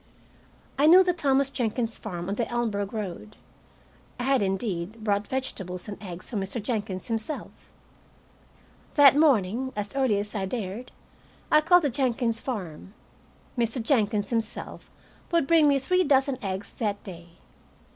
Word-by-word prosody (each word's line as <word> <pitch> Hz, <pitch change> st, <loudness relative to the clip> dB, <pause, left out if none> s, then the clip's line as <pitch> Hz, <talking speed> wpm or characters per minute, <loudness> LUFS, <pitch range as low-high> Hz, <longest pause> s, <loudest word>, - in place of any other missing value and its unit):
I 295 Hz, -, +5 dB
knew 365 Hz, +4 st, +8 dB
the 360 Hz, -1 st, +1 dB
Thomas 275 Hz, -4 st, +1 dB
Jenkins 235 Hz, -2 st, -2 dB
farm 175 Hz, -4 st, -6 dB
on 195 Hz, -, -1 dB
the 230 Hz, +3 st, -1 dB
Elmsburg 220 Hz, -5 st, -2 dB
road. 210 Hz, 0 st, -6 dB, 0.8 s
I -, -, -2 dB
had, 270 Hz, -1 st, +2 dB
indeed, 195 Hz, +1 st, -2 dB
bought 205 Hz, -1 st, 0 dB
vegetables 190 Hz, -9 st, -4 dB
and 205 Hz, -1 st, -8 dB
eggs 180 Hz, -3 st, -8 dB
from 210 Hz, -4 st, -1 dB
Mr. 195 Hz, +5 st, -4 dB
Jenkins 205 Hz, -4 st, -3 dB
himself. 225 Hz, +5 st, -3 dB, 1.2 s
That 285 Hz, -2 st, +8 dB
morning, 260 Hz, -4 st, +2 dB
as 205 Hz, -1 st, -4 dB
early 260 Hz, -7 st, +2 dB
as 205 Hz, +1 st, -4 dB
I 195 Hz, -2 st, -2 dB
dared, 220 Hz, +2 st, -5 dB, 0.6 s
I 305 Hz, -, +6 dB
called 355 Hz, +2 st, +5 dB
the 285 Hz, -, +1 dB
Jenkins 235 Hz, -3 st, 0 dB
farm. 195 Hz, -, -6 dB, 0.6 s
Mr. 235 Hz, 0 st, 0 dB
Jenkins 220 Hz, -4 st, +1 dB
himself 225 Hz, -1 st, -3 dB, 0.4 s
would 335 Hz, -4 st, +3 dB
bring 320 Hz, 0 st, +5 dB
me 280 Hz, -1 st, +4 dB
three 365 Hz, +7 st, +2 dB
dozen 270 Hz, -4 st, +2 dB
eggs 190 Hz, 0 st, -4 dB
that 205 Hz, -3 st, -3 dB
day. 170 Hz, -2 st, -11 dB
225 Hz, 145 wpm, -26 LUFS, 200-270 Hz, 1.2 s, knew